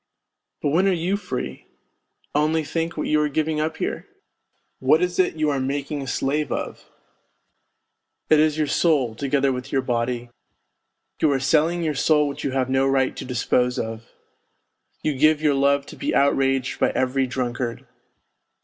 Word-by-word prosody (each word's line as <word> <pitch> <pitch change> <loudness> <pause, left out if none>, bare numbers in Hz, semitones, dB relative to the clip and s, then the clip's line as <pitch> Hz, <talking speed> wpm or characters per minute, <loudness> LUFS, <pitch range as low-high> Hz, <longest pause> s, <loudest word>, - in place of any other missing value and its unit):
But 145 - +2
when 175 +7 +3
are - - +4
you 180 +2 0
free? 65 - -5 0.7
Only 155 +2 +1
think 165 +2 -3
what 150 - -2
you 150 0 +2
are 150 - +1
giving 155 +1 -1
up 160 +1 -2
here? - - -3 0.7
What 135 +4 +4
is 180 +1 -1
it 185 - +2
you 155 -1 +1
are 140 - -1
making 140 +2 -3
a 135 - -6
slave 145 +4 -1
of? - - -5 1.4
It 155 - +5
is 155 0 +3
your 155 - +1
soul, 140 -5 +2
together 140 +3 0
with 125 0 -5
your 135 -1 +1
body; 120 -1 -2 0.9
you 155 - +4
are 135 - +1
selling 160 +6 +2
your 155 -2 0
soul 150 +1 +3
which 140 - -6
you - - 0
have 130 -1 0
no 135 +1 +2
right 135 -1 +1
to - - -6
dispose 125 0 0
of! 115 +1 -5 0.9
You 155 -2 0
give 155 +3 +4
your 150 -2 +2
love 140 0 +2
to - - -11
be 295 +2 -2
outraged 135 -1 +1
by - - +3
every 130 +1 +1
drunkard 125 -2 -3
140 Hz, 170 wpm, -23 LUFS, 130-155 Hz, 1.4 s, It